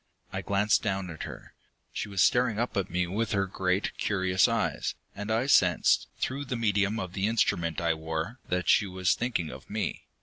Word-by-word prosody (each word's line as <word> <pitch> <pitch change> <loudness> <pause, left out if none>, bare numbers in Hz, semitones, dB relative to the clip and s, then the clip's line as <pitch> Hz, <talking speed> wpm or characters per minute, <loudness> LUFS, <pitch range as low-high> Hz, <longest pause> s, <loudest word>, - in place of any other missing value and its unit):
I - - -2
glanced 100 +1 +2
down 95 -4 -2
at 80 - -6
her. - - -10 0.4
She 105 - -4
was 100 -2 +2
staring 120 -3 +3
up 120 +2 -1
at 100 - -1
me 90 0 0
with 105 +7 -2
her 100 -1 +2
great, 95 0 -1
curious 95 -2 +2
eyes, - - -1 0.2
and 105 +1 -5
I 115 +3 +1
sensed, 90 -10 +4
through 140 +3 -2
the 125 - -3
medium 105 -1 +1
of 90 -1 -5
the 95 +1 0
instrument 85 -7 +1
I 85 -1 +2
wore, 80 +9 -4
that 90 0 -1
she 100 - +4
was 95 -1 +1
thinking 115 -10 -2
of - - -11
me. - - -3
100 Hz, 195 wpm, -28 LUFS, 90-110 Hz, 0.4 s, sensed